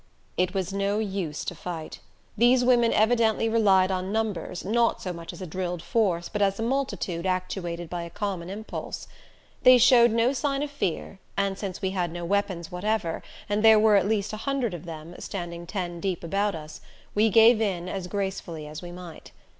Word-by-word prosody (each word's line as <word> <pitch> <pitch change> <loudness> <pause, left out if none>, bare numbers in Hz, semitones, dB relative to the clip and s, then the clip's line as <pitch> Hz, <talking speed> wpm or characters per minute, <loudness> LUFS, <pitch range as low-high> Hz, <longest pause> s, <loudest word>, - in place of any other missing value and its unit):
It 185 +2 0
was 190 0 -2
no 200 +1 0
use 190 -8 -3
to - - -3
fight. 165 -1 -7 0.4
These 245 +3 +4
women 240 -2 +4
evidently 225 0 +3
relied 195 -4 +4
on 185 +1 -2
numbers, 210 -6 -2
not 230 +3 +2
so 180 - -4
much 170 -1 -7
as 190 - -9
a - - -4
drilled 180 0 -4
force 180 -7 +1
but 210 - -3
as 195 0 +2
a - - -1
multitude 200 -9 -1
actuated 180 -2 -2
by 175 +1 -4
a 170 - -6
common 185 -2 -4
impulse. 215 +3 -6 0.5
They 255 0 +8
showed 240 0 +7
no 230 +3 +2
sign 275 0 -1
of 295 - -4
fear, 195 - -3 0.2
and 200 -1 +1
since 195 0 -6
we 190 - +1
had 180 -3 -1
no 175 0 -5
weapons 185 -3 -1
whatever 180 -1 -1 0.3
and 205 +1 0
there 220 -1 +8
were 215 0 +5
at 195 -1 +3
least 215 -1 0
a - - -3
hundred 255 -3 -1
of 175 0 -7
them, 165 0 -8
standing 175 -2 -6
ten 175 -3 -4
deep 185 -1 -2
about 200 +3 0
us, 155 -1 -9 0.3
we 215 +2 +3
gave 225 +2 +6
in 185 -5 -1
as 185 -1 -4
gracefully 190 -5 -4
as 150 +1 -8
we 175 -1 -8
might. 175 -2 -10
195 Hz, 195 wpm, -26 LUFS, 175-220 Hz, 0.5 s, They